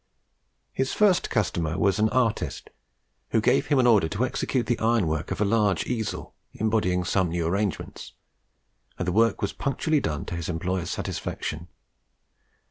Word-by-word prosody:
His 135 0 -1
first 205 -4 +3
customer 85 -7 -1
was 100 0 +2
an 110 +1 +3
artist, 120 -3 -1 0.6
who 115 - +2
gave 135 +5 +2
him 145 - +2
an 130 - +4
order 105 -9 +4
to 105 +10 0
execute 130 -1 -1
the 120 - 0
iron 115 -3 +2
work 80 -1 -2
of - - -3
a 105 - +2
large 105 -2 +2
easel, 110 -4 -3 0.2
embodying 105 -5 +1
some 90 0 +1
new 85 0 -1
arrangements; 100 +3 -3 0.8
and 90 - -3
the - - +1
work 115 +2 +2
was 100 - -1
punctually 150 +2 0
done 75 - -3
to - - -5
his 85 -1 -4
employer's 90 +2 -2
satisfaction. 80 +3 -4
105 Hz, 160 wpm, -26 LUFS, 90-120 Hz, 0.8 s, an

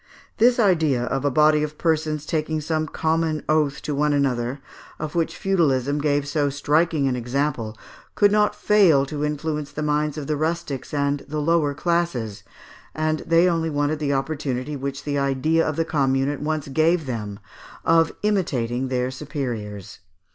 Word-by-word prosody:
This 240 +2 +4
idea 160 - +2
of 135 +3 -2
a 145 - +2
body 150 +2 +4
of 150 0 -4
persons 155 -2 0
taking 155 0 -1
some 155 +1 -1
common 160 -1 -1
oath 150 -2 +1
to 150 - -2
one 150 +1 +1
another, 130 -2 0 0.4
of 155 -1 -5
which 165 -2 -1
feudalism 145 -7 +1
gave 145 -1 +1
so 145 0 +1
striking 145 +1 +1
an 130 - 0
example, 120 -3 -2 0.4
could 205 -1 +4
not 210 0 +2
fail 180 -10 +4
to 145 +1 -4
influence 150 0 -2
the 150 - -4
minds 150 0 0
of 150 - -4
the 150 - -1
rustics 155 -3 -3
and 140 -1 0
the 155 +1 -4
lower 150 -1 +1
classes, 150 - -1 0.5
and 155 0 0
they 165 +2 +5
only 165 -2 0
wanted 145 0 0
the 145 -2 -1
opportunity 140 -1 -2
which 140 0 -5
the 145 -1 -1
idea 140 +4 +1
of 155 - -1
the 165 - 0
Commune 135 -3 +1
at 145 - -4
once 155 0 -2
gave 160 +4 +2
them 105 -6 -4 0.5
of 165 0 +4
imitating 130 - 0
their 125 0 -1
superiors. 120 -8 -5
150 Hz, 165 wpm, -23 LUFS, 135-160 Hz, 0.5 s, they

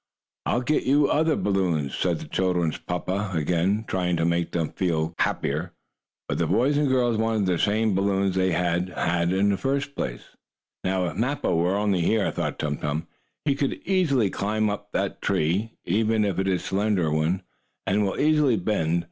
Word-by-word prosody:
"I'll 120 - +1
get 150 +4 +1
you 140 +1 +4
other 155 +1 +2
balloons," 90 -8 0
said - - 0
the - - -9
children's 90 -4 0
papa 95 +3 -3
again, 90 +7 +1
trying 90 -2 0
to 80 - +1
make 85 0 0
them 85 -3 -1
feel 80 -3 -1
happier. - - -1 0.5
But - - -2
the - - +1
boy 130 +4 +2
and 145 0 +2
girl 125 -3 +2
wanted 110 -2 +1
the 90 -3 +1
same 110 +1 +2
balloons 95 0 +1
they 95 0 +1
had 90 +1 0
had 90 +4 +1
first. 140 +1 -1 0.9
"Now 95 -1 0
if 85 - -4
Mappo 125 -4 0
were 90 +3 +2
only 100 -3 +1
here," 105 +4 +2
thought - - -3
Tum 75 -1 -2
Tum, 75 +2 -2 0.4
"he 140 - +3
could 140 -1 -1
easily 145 - +2
climb 105 +1 0
up 105 - -6
that - - -2
tree, 95 +9 0
even 110 +3 +2
if 95 -2 -1
it 95 - 0
is 90 -2 0
a - - -9
slender 95 -5 +1
one, 80 +4 0 0.4
and 105 +2 +2
will 95 - -2
easily 150 -5 +3
bend. 85 -4 0
95 Hz, 175 wpm, -25 LUFS, 85-110 Hz, 0.9 s, you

